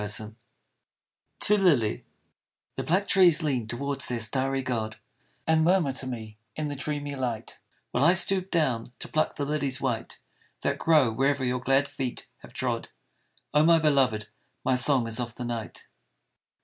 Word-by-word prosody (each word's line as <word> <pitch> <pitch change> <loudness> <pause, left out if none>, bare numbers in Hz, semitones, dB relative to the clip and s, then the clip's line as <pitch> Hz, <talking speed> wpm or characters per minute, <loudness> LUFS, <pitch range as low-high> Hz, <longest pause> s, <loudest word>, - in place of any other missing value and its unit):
ao 105 +1 -4 1.0
TO 210 - +4
LILY 140 - +2 0.7
THE - - -2
black 190 +5 +1
trees 175 -5 +5
lean 130 -7 -1
towards 140 +4 -1
their 120 -1 -2
starry 135 +4 0
God 110 -4 -3 0.5
And 160 0 +3
murmur 175 -4 +3
to 130 0 -4
me 110 -4 -7 0.2
in 155 -1 -3
the 145 - -4
dreamy 145 0 -3
light, 120 -4 -4 0.3
While 125 - +1
I 170 +3 +6
stoop 185 +1 +1
down 125 -9 0
to - - -6
pluck 155 - 0
the 145 - -2
lilies 140 -3 -1
white 120 -4 -3 0.4
That - - -1
grow 150 -7 +4
wherever 135 +3 +1
your 125 0 0
glad 135 +3 +2
feet 135 -3 -5
have - - -14
trod, - - -2 0.6
Oh 150 0 +5
my 165 +1 +6
beloved! 135 -9 +2 0.4
my 130 - +3
song 125 0 +3
is 115 +1 -2
of 120 -2 -4
the 125 - -5
night. 115 -2 -6
135 Hz, 160 wpm, -27 LUFS, 120-150 Hz, 1.0 s, I